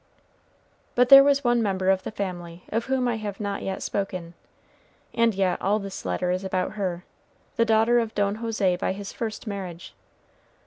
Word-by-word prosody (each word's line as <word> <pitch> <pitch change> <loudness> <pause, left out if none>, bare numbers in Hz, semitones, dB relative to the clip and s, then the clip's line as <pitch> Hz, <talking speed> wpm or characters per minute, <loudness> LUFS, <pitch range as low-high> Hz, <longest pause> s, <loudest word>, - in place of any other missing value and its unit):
But 250 0 +4
there 275 0 +11
was 280 0 +3
one 240 -1 +3
member 190 -3 +1
of 190 -1 +1
the - - -5
family 180 -4 -6
of 225 +2 -1
whom 260 -1 0
I 235 -2 0
have 205 -2 -6
not 200 -1 -3
yet 190 0 -4
spoken, 185 -4 -3 0.8
and 230 -3 +2
yet 190 -2 0
all 205 +2 +2
this 195 -2 -7
letter 90 - -1
is 185 +1 -2
about 185 -1 -1
her, 185 -4 -3 0.5
the 230 - +3
daughter 225 +2 +4
of 225 -1 -3
Don 205 0 0
José 215 -6 0
by - - -1
his 200 0 -7
first 225 0 -5
marriage. 190 -5 -6
200 Hz, 180 wpm, -25 LUFS, 185-230 Hz, 0.8 s, there